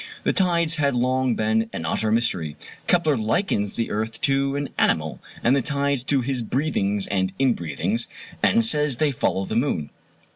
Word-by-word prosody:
The - - +1
tides 170 -3 +2
had 140 -4 +1
long 130 0 +1
been 110 +1 +1
an 80 - -5
utter 110 +7 0
mystery. 95 -10 0 0.3
Kepler 165 -4 +3
likens 110 - 0
the 115 - -2
earth 110 +1 -3
to 135 0 +2
an 145 -1 -2
animal, 80 -1 +1 0.2
and 125 +3 +4
the 140 - +2
tides 140 -1 -1
to 135 -1 +2
his 125 0 -2
breathings 105 -6 0
and 95 -1 0
inbreathings, 105 - 0 0.3
and 230 +1 +4
says 150 - +2
they 150 +1 +2
follow 95 -6 -1
the 110 - -4
moon. 100 - 0
120 Hz, 170 wpm, -23 LUFS, 105-140 Hz, 0.3 s, and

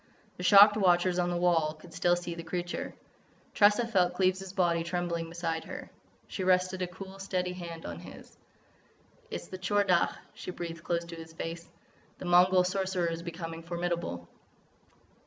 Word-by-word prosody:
The - - -7
shocked 205 +3 +8
watchers 180 -2 +3
on 175 0 +1
the 175 - -1
wall 165 -3 +2
could 165 +2 -15
still 175 +1 +3
see 175 -1 -5
the 170 - -6
creature. 175 +1 -4 0.6
Tressa 210 +3 +5
felt 180 -6 +2
Cleves' 185 0 +1
body 175 -3 +1
trembling 170 -1 -2
beside 165 -1 -3
her. - - -8 0.4
She 190 - -4
rested 185 0 +2
a 180 - 0
cool, 190 +2 -10
steady 185 -2 -2
hand 170 -2 -8
on 85 -1 -6
his. - - -12 0.9
"It - - -5
is - - -14
the 185 - -7
Tchor 205 +2 +2
Dagh," 180 -3 +3 0.2
she - - -8
breathed 170 -2 -6
close 170 -1 -1
to 170 0 -8
his 165 0 -10
face. 165 +1 -6 0.5
"The - - -8
Mongol 180 +1 +5
Sorcerer 185 -2 -1
is 165 0 -4
becoming 165 -1 -6
formidable." 170 - -3
175 Hz, 170 wpm, -30 LUFS, 170-185 Hz, 0.9 s, shocked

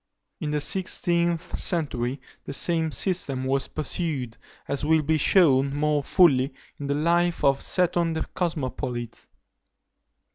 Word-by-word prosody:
In 150 - -3
the 150 0 0
sixteenth 170 -1 0
century, 135 -7 -1 0.3
the - - -6
same 160 +1 +2
system 145 -8 0
was 135 +1 0
pursued, 145 -6 -3 0.3
as 140 -1 -2
will 160 +1 +3
be 155 +1 +1
shewn 140 -5 +3
more 150 0 +1
fully 135 -5 +3 0.2
in 145 - -5
the 140 - 0
life 170 +3 +1
of 140 -1 +3
Seton 175 -2 +1
the 160 - -3
Cosmopolite. 130 -8 -4
150 Hz, 130 wpm, -25 LUFS, 135-170 Hz, 0.3 s, will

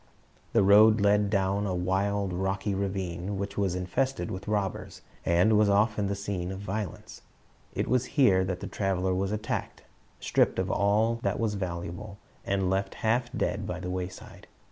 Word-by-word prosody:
The - - +4
road 105 +3 +7
led 100 0 +3
down 100 0 +1
a 90 - -1
wild, 95 +2 0
rocky 95 +2 -1
ravane, 95 -1 -3
which 100 +1 -4
was 95 -3 0
infested 90 +3 -1
with 95 - -6
robbers, 100 -3 -3 0.2
and 90 +6 +4
was 105 -1 +4
often 105 0 +2
the 100 - -1
scene 100 -3 -4
of 95 - -6
violence. 100 -2 -5 0.5
It - - -1
was 130 0 +2
here 95 -10 +5
that 90 -1 -3
the - - -4
traveler 95 -2 -1
was 95 +2 -1
attacked, 105 0 -4 0.4
stripped - - +2
of 95 0 -1
all 110 +3 +2
that - - -1
was 110 -2 0
valuable, 95 +1 -5 0.3
and 95 -1 0
left 95 +1 -1
half 120 +2 +1
dead 105 -4 -2
by 90 - -4
the 90 0 -4
wayside. 90 0 -7
100 Hz, 165 wpm, -28 LUFS, 95-105 Hz, 0.5 s, road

